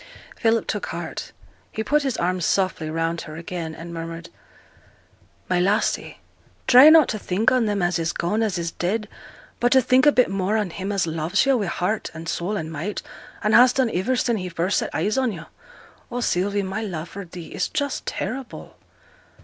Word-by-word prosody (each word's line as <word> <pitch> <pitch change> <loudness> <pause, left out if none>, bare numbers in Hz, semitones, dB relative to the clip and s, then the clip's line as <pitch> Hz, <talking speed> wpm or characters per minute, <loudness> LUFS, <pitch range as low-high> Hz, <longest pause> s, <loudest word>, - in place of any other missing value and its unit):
Philip 225 -1 +1
took - - -3
heart. - - -6 0.4
He 220 - -3
put 295 +6 +2
his 270 -4 -2
arm 180 +1 0
softly 185 -3 0
round 165 +1 -1
her 155 -3 -9
again, 165 -1 -5
and 170 +1 -9
murmured 165 0 -6 1.2
'My 180 - +1
lassie, 200 +5 0 0.5
try 260 +4 +9
not 315 -3 +7
to 215 - -2
think 200 +4 +1
on 250 -3 +2
them 205 -3 0
as 175 -1 +1
is 165 0 0
gone, 210 +6 -1
as 210 -5 0
is 170 -1 -3
dead, 210 +6 -2 0.5
but 245 0 +3
t' 265 - +7
think 255 +2 +4
a - - +8
bit 250 -3 +4
more 195 +2 0
on 205 -5 -1
him 195 +3 -4
as 195 -3 +1
loves 165 +6 0
yo' 270 -1 +4
wi' 210 -6 -1
heart, 180 +5 -2
and 165 +1 -8
soul, 180 +5 -2
and 160 -3 -5
might, 170 +7 -4 0.4
and 215 - +2
has 245 +2 +7
done 255 -4 0
iver 220 +9 +1
sin' 240 -2 +1
he 185 -2 -4
first 175 +3 0
set - - -3
eyes 215 +5 0
on 255 -3 +1
yo'. 170 -4 -8 0.6
Oh, 245 0 -3
Sylvie, 200 -1 0
my 190 +3 -3
love 175 -6 -5
for 200 - -7
thee 175 -1 -10
is - - -1
just 285 -3 -3
terrible.' 250 +4 -5
195 Hz, 200 wpm, -23 LUFS, 170-230 Hz, 1.2 s, try